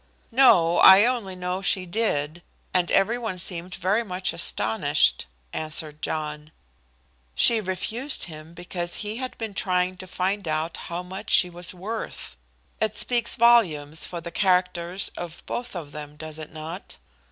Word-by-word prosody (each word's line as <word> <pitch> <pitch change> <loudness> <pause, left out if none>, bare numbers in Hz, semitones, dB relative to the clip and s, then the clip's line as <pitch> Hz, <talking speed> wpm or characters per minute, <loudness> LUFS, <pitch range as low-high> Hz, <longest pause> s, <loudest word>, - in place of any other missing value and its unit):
"No; 180 -10 +5
I 190 +3 +9
only 235 -7 -1
know 180 +1 -3
she 190 -1 +3
did, 175 -5 -1 0.3
and 180 -1 +2
every 225 +5 +2
one 220 -6 -4
seemed 180 +1 -2
very 190 +5 +1
much 185 -3 -2
astonished," 110 - +1 0.3
answered 155 -1 -4
John. 150 -1 -4 0.8
"She 230 - +4
refused 220 +8 -2
him 160 0 -10
because 175 0 -4
he 210 +2 -4
had 255 0 -5
been 220 -3 -5
trying 185 -1 0
to 185 - -10
find 190 +1 -2
out 155 +2 -1
how 175 +1 -6
much 185 +2 -8
she 180 -2 +5
was 175 0 -3
worth. 210 - -4 0.4
It 215 -1 0
speaks 240 0 +2
volumes 165 -11 +4
for 175 - -4
the 170 - -7
characters 180 0 +1
of 175 -1 -8
both 245 -3 -4
of 155 -5 -6
them, 150 0 -8
does 155 0 -7
it 155 - -8
not?" 160 +4 -8
180 Hz, 150 wpm, -25 LUFS, 160-205 Hz, 0.8 s, I